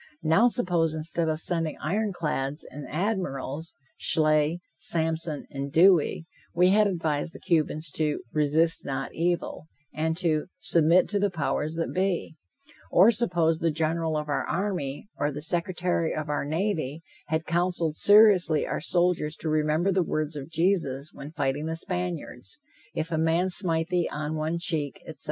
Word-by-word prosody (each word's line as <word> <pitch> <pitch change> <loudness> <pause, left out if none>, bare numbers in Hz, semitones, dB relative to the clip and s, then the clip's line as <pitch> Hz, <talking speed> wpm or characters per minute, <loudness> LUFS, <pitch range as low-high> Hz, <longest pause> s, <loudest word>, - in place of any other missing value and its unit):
Now, 165 +10 +4
suppose, 175 -9 +1
instead 160 +1 -1
of 155 0 -1
sending 165 -2 0
iron 205 +7 -1
clads 150 -4 -2
and 145 +1 -8
admirals, 165 -5 -3 0.2
Schley, 155 +1 +2 0.2
Sampson 160 +1 0
and 140 0 -5
Dewey, 170 -1 +4 0.3
we 180 +1 +5
had 210 +2 +4
advised 160 -4 -2
the - - -9
Cubans 155 -3 0
to 150 -1 -1
"resist 155 +2 +2
not 135 0 -4
evil," 170 -2 -2 0.3
and 160 +1 -1
to 165 -4 0
"submit 170 +2 +3
to 205 - +1
the 205 0 +2
powers 155 -2 -2
that 165 0 -3
be," 185 -3 -1 0.5
or 195 +6 +6
suppose 175 -8 +1
the 165 - +1
General 160 0 -1
of 150 0 -3
our 145 - -1
army, 180 -7 -3
or 145 - 0
the 145 - -6
Secretary 175 +1 -1
of 155 -1 -4
our 145 -1 -1
navy, 160 -2 -2 0.2
had 160 0 -1
counseled 175 -2 0
seriously 205 -6 +5
our - - -3
soldiers 175 -2 +1
to 160 - -4
remember 155 +4 +1
the 190 0 +2
words 155 -2 -2
of 140 0 -7
Jesus 160 -5 0
when 145 +2 -9
fighting 145 -1 -2
the 160 - -2
Spaniards: 175 - -4 0.4
"If 160 +1 -3
a 160 - 0
man 165 +3 +2
smite 165 -3 0
thee 175 -2 0
on 150 +1 -3
one 155 +2 -1
cheek," 155 -5 -1
etc. - - -10
160 Hz, 160 wpm, -26 LUFS, 155-175 Hz, 0.5 s, or